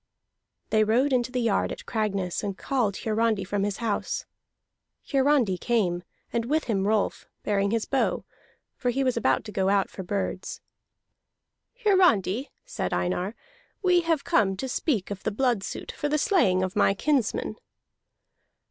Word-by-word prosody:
They 215 -1 +4
rode 250 +6 +2
into 250 -1 +1
the 250 - -1
yard 225 -4 +1
at - - -7
Cragness 200 -5 -1
and 200 -2 -4
called 235 -8 0
Hiarandi 220 -2 +1
from 195 +1 -1
his 200 -1 -1
house. 225 -3 -2 0.9
Hiarandi 270 -9 +3
came, 190 -8 +1 0.3
and 230 -1 0
with 310 +5 +1
him 200 -4 0
Rolf, 215 -1 0 0.2
bearing 200 -1 +1
his 225 +1 0
bow, 270 - 0 0.5
for 250 - -1
he 270 +3 +1
was 255 -2 +1
about 230 - +2
to 210 - -8
go 190 -1 +1
out 200 -1 +2
for - - -7
birds. 190 0 -3 1.3
"Hiarandi," 280 - +3 0.2
said - - -3
Einar, 180 +4 -1 0.5
"we 360 -1 +4
have 325 -4 0
come 195 -2 +2
to 265 - -3
speak 245 - -1
of 195 -2 -5
the - - -1
blood 235 0 +1
suit - - -6
for 295 - -3
the 300 - +2
slaying 195 - +3
of 185 0 -3
my 195 - +3
kinsman." 275 0 0
220 Hz, 155 wpm, -26 LUFS, 195-265 Hz, 1.3 s, They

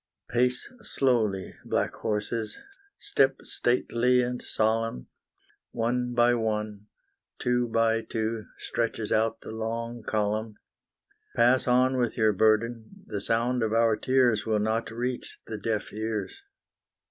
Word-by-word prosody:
Pace 125 +1 +1
slowly, 115 - 0
black - - -1
horses, 110 0 -3 0.4
step 135 0 +2
stately 125 0 +2
and 125 0 -3
solemn 110 - -1 0.7
One 125 +1 -1
by 120 0 +5
one 105 -2 -2 0.5
two 125 0 +1
by 115 0 +2
two 110 -1 -3
stretches 115 -2 -2
out 115 +1 +1
the - - -8
long 115 +1 -4
column; 110 0 -1 0.8
Pass 125 +3 +5
on 130 +1 +3
with 120 -2 0
your 110 -2 +3
burden, 115 - +1
the 105 -2 -4
sound 120 +4 +1
of 110 -1 0
our 115 -1 +4
tears 125 -2 +2
Will 110 -1 +1
not 110 +2 0
reach 120 +2 -4
the 110 -1 -6
deaf 110 0 -2
ears. 110 - -4
115 Hz, 125 wpm, -27 LUFS, 110-120 Hz, 0.8 s, by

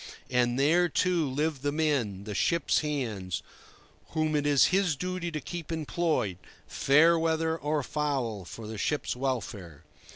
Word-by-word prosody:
And 125 -1 +2
there, 170 +5 +4
too, 175 -6 +1
live 145 +1 -1
the 145 +1 0
men, 140 -11 0
the 105 0 -5
ship's 170 - +2
hands, 115 - -3 0.7
whom 155 -1 +1
it 145 0 +1
is 145 -2 +5
his 190 -5 +3
duty 180 +3 -3
to 155 -2 -4
keep 170 +2 -7
employed, 155 - -1 0.3
fair 165 +5 +4
weather 160 0 +1
or 150 -2 -1
foul, 130 -9 -2
for 110 +6 -9
the 110 -1 -6
ship's 150 +1 -1
welfare. 115 - -4
145 Hz, 150 wpm, -29 LUFS, 120-160 Hz, 0.7 s, is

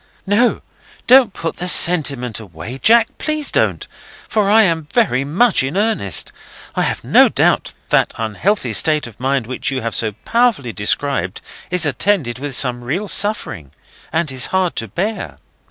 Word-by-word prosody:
"No; 215 +5 +2 0.4
don't 255 -3 +6
put 165 -3 -5
the 180 - -4
sentiment 140 - +3
away, 100 +5 -9
Jack; 230 +4 +3
please 305 -2 -2
don't; - - 0 0.4
for 210 -2 0
I 220 +2 +6
am 165 -5 0
very 195 - +1
much 190 - +2
in 135 +7 -3
earnest. 200 - 0 0.4
I - - -1
have - - -2
no - - +5
doubt - - +1
that - - +2
that - - -14
unhealthy 115 - -1
state 150 +10 +1
of 115 -3 -13
mind 135 -1 -1
which 130 +3 -3
you 135 -1 -3
have 115 - -3
so 110 -2 0
powerfully 230 - +1
described 105 0 -2 0.3
is 180 -2 +1
attended 145 - 0
with 140 -1 -3
some 125 -2 +2
real 175 +12 -3
suffering, 195 - -1 0.4
and 160 -2 -1
is 130 -1 -1
hard 185 -2 -1
to 115 - -3
bear. 200 - -4
150 Hz, 165 wpm, -17 LUFS, -, 0.4 s, don't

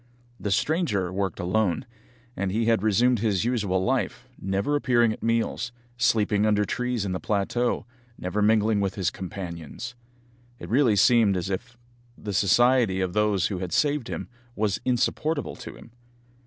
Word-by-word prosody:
The 105 - -3
stranger 110 - 0
worked 95 0 -2
alone, 100 +5 0 0.5
and 95 0 -2
he 110 +3 0
had 115 -3 +3
resumed 115 +3 +3
his 105 -2 0
usual 100 -7 0
life, 125 0 -1
never 100 +9 0
appearing 120 -5 +3
at - - -11
meals, 115 +1 -1 0.2
sleeping 110 -3 +2
under 105 -1 +3
the - - -2
trees 125 -1 -2
in 95 - -2
the 90 - -2
plateau, 110 +4 -1 0.3
never 90 +4 -2
mingling 110 0 +3
with 100 -1 -1
his 95 -5 0
companions. 90 - -7 0.6
It - - -9
really 120 -3 +3
seemed 110 -3 +4
as 90 +2 -3
if 120 +6 -5 0.4
the 105 -1 -5
society 115 +1 +3
of 95 -2 -1
those 105 -2 +2
who 95 -4 -2
had 90 -2 -4
saved 145 -4 +1
him - - -5 0.3
was 105 -2 -1
insupportable 145 +5 0
to - - -9
him! - - -15
105 Hz, 160 wpm, -25 LUFS, 95-120 Hz, 0.6 s, seemed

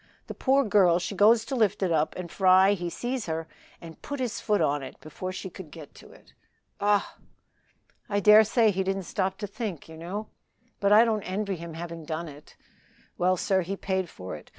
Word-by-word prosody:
The - - -7
poor 275 +1 +2
girl 195 -6 +4
she 180 +3 -4
goes 220 +3 +4
to 270 - -4
lift 210 -4 +1
it 180 - +1
up 155 -1 +1
and 180 -2 -7
Fry 190 +1 +5
he 175 -3 -3
sees 245 +4 -4
her 160 0 -3 0.3
and 165 -2 -12
put 285 -1 -6
his 240 -3 -3
foot 210 -2 +1
on 145 0 +1
it 135 - -10
before 185 +4 -7
she 185 - -6
could 185 -3 -10
get 155 -2 -12
to - - -15
it." - - -20 0.5
"Ah!" 205 0 +1 0.9
"I 205 -1 +1
dare 210 +2 +7
say 220 0 +3
he 190 0 -1
didn't 195 0 -2
stop 190 +1 -2
to 215 - -4
think, 200 - -6
you 160 0 -11
know; 195 +6 -6 0.5
but 200 0 +2
I 215 +3 +7
don't 220 -2 0
envy 195 +1 -3
him 170 -1 -8
having 170 0 -7
done 160 +2 -4
it. 145 0 -13 0.6
Well, 185 +1 +2
sir, 190 +2 +1
he 195 +3 -4
paid 190 -3 -2
for 95 - -8
it. 75 - -13
190 Hz, 210 wpm, -27 LUFS, 170-210 Hz, 0.9 s, dare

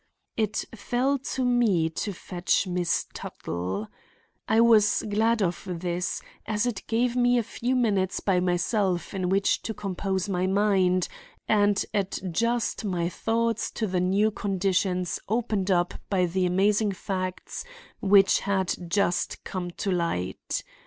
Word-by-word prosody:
It 215 -2 -1
fell 250 +5 0 0.2
to 260 -1 0
me 230 -10 +3
to 205 +5 -3
fetch 180 0 -1
Miss 180 -2 0
Tuttle. 90 +5 -4 0.6
I 220 +1 +4
was 220 -3 +5
glad 220 +1 +2
of 175 -1 -1
this, 175 +1 -2 0.2
as 210 +1 0
it 235 -5 -2
gave 235 +2 +1
me 245 0 +4
a 235 - +2
few 240 +3 -2
minutes 200 -6 +1
by 190 -3 +2
myself 180 +1 0
in 185 -2 -1
which 195 +1 +2
to 220 - -4
compose 190 -1 -2
my 185 -1 0
mind 190 -2 +2 0.4
and 205 -1 +3
adjust 210 +4 -1
my 175 -4 -1
thoughts 230 +4 0
to 220 - -1
the 185 -3 0
new 200 +4 +2
conditions 190 -3 0
opened 215 -4 0
up 175 -1 +2 0.2
by 185 -3 +2
the 180 +1 0
amazing 200 +3 +2
facts 185 -1 -4 0.4
which 195 -1 +5
had 190 -2 0 0.2
just 180 -1 0
come 180 -2 -4
to 190 +3 -3
light. 170 - -2
195 Hz, 140 wpm, -26 LUFS, 180-220 Hz, 0.6 s, was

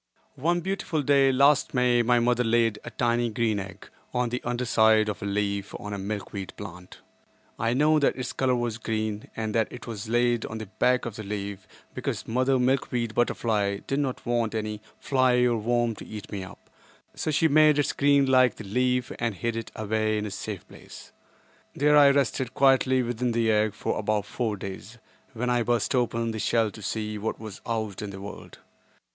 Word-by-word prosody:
One 175 +5 +1
beautiful 185 -5 -2
day 140 -1 +4
last 140 +1 +3
May 125 -1 +3
my 120 +1 +3
mother 120 +1 +2
laid 115 -2 +2
a - - -6
tiny 120 0 0
green 110 -2 0
egg 95 0 -9 0.3
on 125 -1 +1
the 125 +2 -3
under 120 +1 -2
side 110 -1 +4
of 105 - -5
a 100 - -3
leaf 100 0 -2
on 105 0 -6
a 100 - -4
milkweed 100 -1 -5
plant. 90 -3 -10 0.6
I 115 +2 +1
know 155 +3 +4
that 140 - +2
its 130 -1 -4
color 130 -1 +1
was 120 -2 -2
green 110 -1 -3
and 110 -1 -3
that 115 -2 +2
it 125 - -9
was 110 -2 -6
laid 120 0 +2
on 110 - -6
the 110 - -6
back 125 +5 +1
of 115 -3 -6
the 110 - -6
leaf 100 -1 -5 0.3
because - - -4
Mother 130 +3 +2
Milkweed 125 -3 0
Butterfly 105 -4 0
did 135 - -1
not 135 -3 -3
want 120 -2 0
any 105 -1 -3 0.2
fly 130 -2 +2
or 120 -1 +2
worm 120 +1 +1
to - - -9
eat 105 -2 -8
me 100 -2 -4
up, 95 +2 -13 0.4
so - - -3
she 155 +2 +3
made 155 0 +5
its 145 - +1
green 140 -1 +4
like 130 -3 +4
the - - -9
leaf 125 +4 0
and 115 -3 -1
hid 115 +5 -2
it 115 - -5
away 110 0 0
in 105 - -2
a 105 - -5
safe 100 -1 -6
place. - - -13 0.6
There 150 +1 +4
I 145 -1 +8
rested 135 -3 0
quietly 130 -1 +4
within 120 0 -1
the 115 -1 +2
egg 105 -1 +1
for - - -2
about 105 -1 0
four 110 0 -2
days, 95 +4 -8 0.4
when 125 +1 -1
I 120 -1 +2
burst 120 +3 0
open 115 -2 0
the 110 - -5
shell 110 0 +1
to 110 - -12
see 105 +1 -3
what 110 +2 -3
was 110 -3 -9
out 110 -4 -3
in 105 - -5
the 95 -1 -8
world. 100 +1 -9
115 Hz, 200 wpm, -26 LUFS, 105-125 Hz, 0.6 s, I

